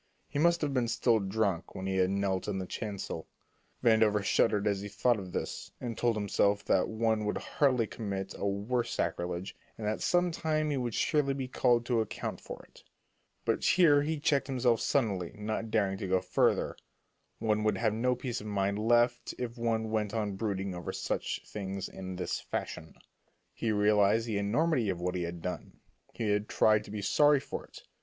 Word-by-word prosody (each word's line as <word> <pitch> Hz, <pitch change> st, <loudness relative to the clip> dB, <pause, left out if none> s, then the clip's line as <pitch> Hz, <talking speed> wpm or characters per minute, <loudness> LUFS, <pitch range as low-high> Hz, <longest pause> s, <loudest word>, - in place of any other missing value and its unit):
He 145 Hz, -, -3 dB
must 170 Hz, +2 st, +4 dB
have 145 Hz, -3 st, 0 dB
been 125 Hz, -3 st, +1 dB
still 115 Hz, 0 st, +2 dB
drunk 100 Hz, -3 st, -1 dB
when 95 Hz, -, -5 dB
he 95 Hz, 0 st, -1 dB
had 95 Hz, 0 st, +3 dB
knelt 95 Hz, -1 st, -1 dB
in 100 Hz, -2 st, -1 dB
the 95 Hz, -, -3 dB
chancel. 100 Hz, -5 st, -5 dB, 0.6 s
Vandover 110 Hz, -3 st, +4 dB
shuddered 105 Hz, 0 st, +2 dB
as 100 Hz, -2 st, +1 dB
he 100 Hz, -, -5 dB
thought 110 Hz, +3 st, +1 dB
of 95 Hz, -2 st, -8 dB
this, -, -, -4 dB
and 120 Hz, -2 st, -4 dB
told 120 Hz, 0 st, +1 dB
himself 100 Hz, -1 st, +1 dB
that 95 Hz, -, +3 dB
one 110 Hz, -1 st, 0 dB
could 105 Hz, -, -1 dB
hardly 130 Hz, -5 st, +1 dB
commit 100 Hz, -3 st, -4 dB
a 100 Hz, -, -2 dB
worse 105 Hz, +5 st, -1 dB
sacrilege, 90 Hz, +1 st, -2 dB, 0.2 s
and 110 Hz, -, -5 dB
that 105 Hz, +1 st, -1 dB
some 175 Hz, 0 st, +2 dB
time 155 Hz, -2 st, 0 dB
he 140 Hz, -, 0 dB
would 120 Hz, -3 st, -2 dB
surely 145 Hz, -3 st, +1 dB
be 135 Hz, -2 st, -3 dB
called 120 Hz, -2 st, +2 dB
to 120 Hz, -2 st, +2 dB
account 110 Hz, -, -4 dB
for -, -, -8 dB
it. -, -, -19 dB, 0.6 s
But -, -, 0 dB
here 160 Hz, -5 st, +5 dB
he 155 Hz, +1 st, -1 dB
checked 145 Hz, -3 st, +1 dB
himself 125 Hz, -4 st, +2 dB
suddenly, 100 Hz, -, 0 dB
not 110 Hz, +1 st, -3 dB
daring 100 Hz, -3 st, +1 dB
to 95 Hz, -, -3 dB
go 95 Hz, 0 st, +3 dB
further. 90 Hz, 0 st, +1 dB, 0.6 s
One 110 Hz, -1 st, 0 dB
would 105 Hz, -2 st, +2 dB
have 110 Hz, -1 st, +1 dB
no 125 Hz, +3 st, +1 dB
peace 125 Hz, -2 st, -4 dB
of 105 Hz, -, -8 dB
mind 100 Hz, 0 st, 0 dB
left 120 Hz, +2 st, +2 dB
if 120 Hz, -1 st, -4 dB
one 115 Hz, -2 st, -1 dB
went 110 Hz, 0 st, -1 dB
on 105 Hz, -3 st, -1 dB
brooding 95 Hz, -2 st, -2 dB
over 90 Hz, -1 st, -5 dB
such -, -, -2 dB
things 95 Hz, -1 st, -5 dB
in 95 Hz, -1 st, -7 dB
this 90 Hz, -, -2 dB
fashion. 80 Hz, -, -5 dB, 0.6 s
He 115 Hz, -, -1 dB
realized 105 Hz, +1 st, +3 dB
the 110 Hz, -3 st, -1 dB
enormity 120 Hz, +3 st, +1 dB
of 90 Hz, -2 st, -2 dB
what 90 Hz, +1 st, -1 dB
he 90 Hz, -, -2 dB
had 85 Hz, -1 st, -5 dB
done. 90 Hz, -, -5 dB, 0.3 s
He 110 Hz, -, -2 dB
had 105 Hz, +1 st, 0 dB
tried 105 Hz, -1 st, +4 dB
to -, -, -12 dB
be 105 Hz, 0 st, -5 dB
sorry 145 Hz, +7 st, +5 dB
for -, -, -6 dB
it. -, -, -14 dB
110 Hz, 195 wpm, -31 LUFS, 100-120 Hz, 0.6 s, here